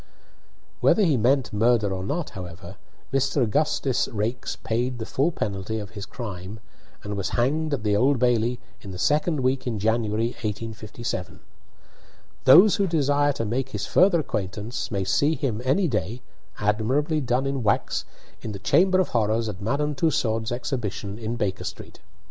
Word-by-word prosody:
Whether 215 - +4
he 160 -7 +3
meant 130 +2 +2
murder 110 -2 +2
or 95 0 -4
not, 150 - -3
however, 90 0 -9 0.4
Mr. 135 0 +2
Augustus 135 +2 +1
Raikes 110 +2 -3
paid 120 +2 -2
the 110 - -5
full 140 +9 +1
penalty 105 - -3
of 105 -2 -6
his 100 -2 -7
crime, 100 -2 -7 0.4
and 105 0 -4
was 100 -3 -2
hanged 150 +6 +1
at 115 - -8
the 105 -1 +2
Old 135 +6 +3
Bailey 120 0 +2 0.2
in 100 - -10
the 95 - -6
second 150 - +1
week 130 +1 0
in 115 -3 -1
January, 110 +1 +1
1857. 110 -2 -5 1.0
Those 185 +10 +8
who 200 -2 +2
desire 145 -3 +2
to 115 -4 -3
make 125 +5 -1
his 105 -5 -4
further 180 - +4
acquaintance 105 - -4
may 100 -3 -1
see 145 +11 +2
him 120 -8 -2
any 150 +9 +2
day 115 - -2 0.3
(admirably 130 +9 +1
done 125 +1 0
in 135 -1 -1
wax) 105 -3 +1 0.4
in 110 - -5
the - - -5
Chamber 185 - +3
of 185 - +1
Horrors 110 0 +1
at 100 -2 -6
Madame 145 +7 0
Tussaud's 120 -6 0
exhibition, 115 -5 -3
in 115 +1 -3
Baker 105 -6 -2
Street. - - -8
120 Hz, 160 wpm, -25 LUFS, 105-140 Hz, 1.0 s, Those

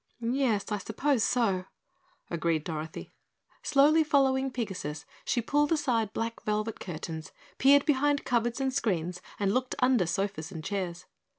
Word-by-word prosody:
"Yes, 250 -7 +1
I 210 - 0
suppose 240 +4 0
so," 200 -8 +1 0.7
agreed 165 -2 0
Dorothy. 160 -1 -6 0.5
Slowly 300 +3 +5
following 270 -2 +2
Pigasus, 185 - -4 0.2
she 240 - 0
pulled 295 +5 +2
aside 245 -9 +1
black 230 +1 -3
velvet 215 +1 -2
curtains, 160 -2 -6 0.3
peered 280 +1 +6
behind 290 0 +2
cupboards 240 0 0
and 265 -1 0
screens 180 - -1 0.2
and 200 -1 +1
looked 255 0 0
under 250 -8 +3
sofas 185 -3 -2
and 160 -4 -7
chairs. 185 -2 -3
225 Hz, 135 wpm, -29 LUFS, 180-265 Hz, 0.7 s, peered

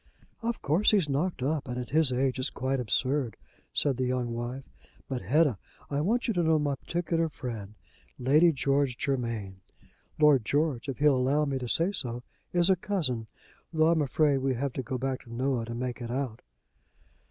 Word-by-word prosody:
"Of 230 0 -3
course 165 +9 +3
he's 195 -7 +3
knocked 145 +1 -1
up, 145 +1 -1
and 125 0 -4
at 125 -1 -5
his 155 -2 +5
age 130 +1 0
it's 130 - +1
quite 130 +1 -2
absurd," 125 +3 0 0.3
said 140 -4 +1
the 130 - 0
young 125 -2 -1
wife. 120 +3 -5 0.4
"But 130 -2 -3
Hetta, 130 - +2 0.3
I 140 +1 0
want 230 +9 +1
you 225 - +1
to 175 - +1
know 160 -1 +3
my 145 -2 0
particular 165 +3 -1
friend 110 -8 -7 0.4
Lady 150 +7 +5
George 140 -2 +1
Germain. 115 -8 -3 0.6
Lord 150 -5 +5
George, 145 0 0
if 135 - -3
he'll 150 0 +4
allow 135 +4 +2
me 135 -2 -2
to 125 - -4
say 170 +9 +2
so, 125 -10 -3 0.3
is 175 +1 +4
a - - +5
cousin, 155 - -2 0.4
though 160 -1 +3
I'm 165 -2 +3
afraid 145 0 +2
we 130 -1 0
have 135 +1 -2
to 130 - -3
go 130 +1 -4
back 130 +1 -2
to 115 - -13
Noah 125 0 -1
to 115 +1 -6
make 125 0 -4
it 120 - -5
out." 125 -2 -3
135 Hz, 190 wpm, -28 LUFS, 125-155 Hz, 0.6 s, his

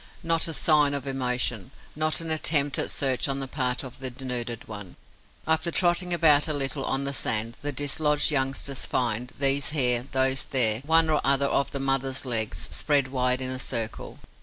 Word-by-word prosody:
Not 165 0 +1
a 165 - -4
sign 150 -3 +3
of 140 -1 -4
emotion, 125 -5 -2 0.3
not 155 +2 +1
an 165 -1 -3
attempt 145 -2 +1
at - - 0
search 135 -1 0
on 135 0 -2
the 135 - -4
part 125 -2 -2
of 130 -1 -10
the 130 -1 -2
denuded 120 -2 -5
one. 105 -4 -9 0.5
After 160 +2 +1
trotting 175 +1 +1
about 155 -4 +4
a 155 - 0
little 135 0 -1
on 135 +1 -1
the 140 0 -2
sand, 115 -3 -1
the 145 - -3
dislodged 145 +2 +1
youngsters 135 -1 0
find, 120 0 -2
these 140 +1 +3
here, 125 -4 +1
those 130 0 0
there, 115 -5 +2
one 165 0 +5
or 155 -2 +1
other 140 0 +3
of 140 0 0
the 140 - -5
mother's 135 0 -1
legs, 115 -4 -2
spread 145 -3 +1
wide 125 -1 0
in 130 0 -3
a 130 - -5
circle. 115 -3 -3
135 Hz, 185 wpm, -26 LUFS, 125-150 Hz, 0.5 s, one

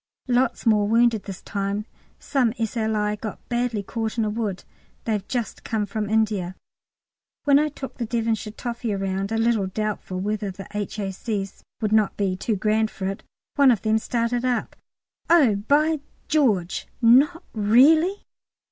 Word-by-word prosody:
Lots 250 +1 +1
more 210 -2 +4
wounded 230 -1 +3
this 195 -2 -8
time. 200 0 -2 0.3
Some 260 -6 0
S.L.I. 220 -2 -1
got 210 0 -7
badly 240 -3 -1
caught 225 +2 -3
in 225 - +2
a 210 - -1
wood; 210 -4 -3 0.4
they've 210 -3 -2
just 240 -3 -3
come 220 -3 -1
from 210 0 -3
India. 210 -5 0 0.9
When 285 -1 +5
I 305 +1 +1
took 270 -2 -9
the 235 - -2
Devonshire 225 -2 -1
toffee 235 -2 -3
round, 195 +1 -2
a 225 - 0
little 225 -3 +2
doubtful 205 -2 -3
whether 205 +1 -2
the 195 +1 -8
H.A.C.'s 205 0 -4 0.2
would 215 -1 0
not 215 -2 +3
be 195 -2 0
too 215 +4 -1
grand 215 +2 +1
for 190 - -6
it, 195 +1 -3 0.4
one 280 -2 +6
of 235 -5 +2
them 220 0 +2
started 235 +1 -1
up, 250 -1 -1 0.5
"Oh, 285 -12 +5
by 295 +9 +2 0.3
George, 215 - +1 0.2
not 285 +9 +5
really!" 290 - +4
220 Hz, 155 wpm, -24 LUFS, 205-240 Hz, 0.9 s, one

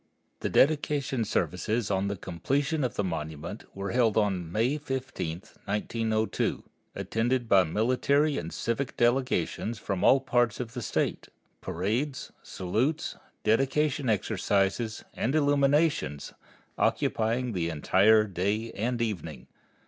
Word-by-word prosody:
The - - -2
dedication 140 -4 +2
services 100 +5 -1
on 95 0 +1
the 100 - -2
completion 140 - -1
of 125 -1 -1
the 105 - 0
monument 80 +2 -5
were 100 0 -4
held 115 -4 +2
on 95 -6 0
May 120 - +1
15, 130 - -4 0.2
1902, 110 +1 -1 0.3
attended 120 +2 0
by 95 -3 +6
military 130 - +2
and 85 0 -6
civic 120 +3 -2
delegations 120 -3 +1
from 100 -3 -3
all 135 - +6
parts 120 -4 +1
of 120 -2 -5
the 125 - -4
State, - - -1 0.3
parades, 110 - -2
salutes, 120 - -1 0.3
dedication 135 +4 +1
exercises, 105 +1 0
and 130 +6 -1
illuminations, 145 - +2 0.5
occupying 115 +3 +1
the 85 -5 -1
entire 95 +7 +4
day 105 +3 -2
and 115 +2 -1
evening. 80 - -4
110 Hz, 120 wpm, -28 LUFS, 95-130 Hz, 0.5 s, by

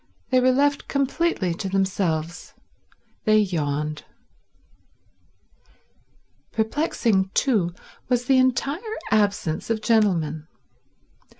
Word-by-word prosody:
They 255 - +5
were 255 +1 +4
left 285 +2 +1
completely 280 - 0
to 195 +2 -4
themselves. 185 -4 -2 0.7
They 215 -1 +5
yawned. 150 -6 -1 2.5
Perplexing, 220 - 0
too, 200 -11 +1 0.3
was 245 -1 +1
the 265 0 +4
entire 280 - 0
absence 200 -6 0
of 220 -1 -1
gentlemen. 165 -9 +1
215 Hz, 85 wpm, -23 LUFS, 175-255 Hz, 2.5 s, They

